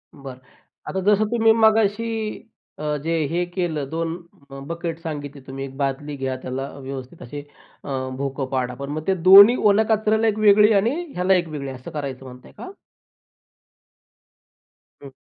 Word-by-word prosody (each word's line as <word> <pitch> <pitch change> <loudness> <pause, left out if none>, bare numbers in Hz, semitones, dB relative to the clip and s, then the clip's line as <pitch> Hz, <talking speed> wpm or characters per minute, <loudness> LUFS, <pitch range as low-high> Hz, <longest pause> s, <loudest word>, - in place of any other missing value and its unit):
बरं. 135 -2 -10 0.5
आता 190 - -2
जसं 210 +1 +2
तुम्ही 225 -1 +3
मगाशी 220 0 +1 0.4
अ, 150 -1 -2
जे 160 +4 -4 0.2
हे 175 +1 0
केलं, 170 -6 -3
2 165 0 -3 0.5
बकेट 170 -1 -5
सांगितले 145 -4 -7
तुम्ही. 135 +1 -6
1 135 0 -11
बादली 140 +1 -3
घ्या 130 -1 -3
त्याला 135 +2 -4
व्यवस्थित 135 +3 -8
अशी 145 +4 -7 0.4
अ, - - -9 0.3
भोकं 135 0 -3
पाडा. 125 -1 -1
पण 140 +2 -7
मग 155 +3 -5
ते 190 - +3 0.2
दोन्ही 200 +5 +10 0.2
ओल्या 215 +2 +3
कचऱ्याला 220 +1 +1
1 215 0 0
वेगळी 210 +1 +6
आणि 225 +8 +2 0.2
ह्याला 180 +2 +2
1 175 -2 +1
वेगळी 145 -3 -6
असं 130 -1 -10
करायचं 135 -3 -6
म्हणताय 125 0 -13
का? 375 - -8 2.3
हं. 135 - -10
160 Hz, 155 wpm, -22 LUFS, 135-205 Hz, 2.3 s, दोन्ही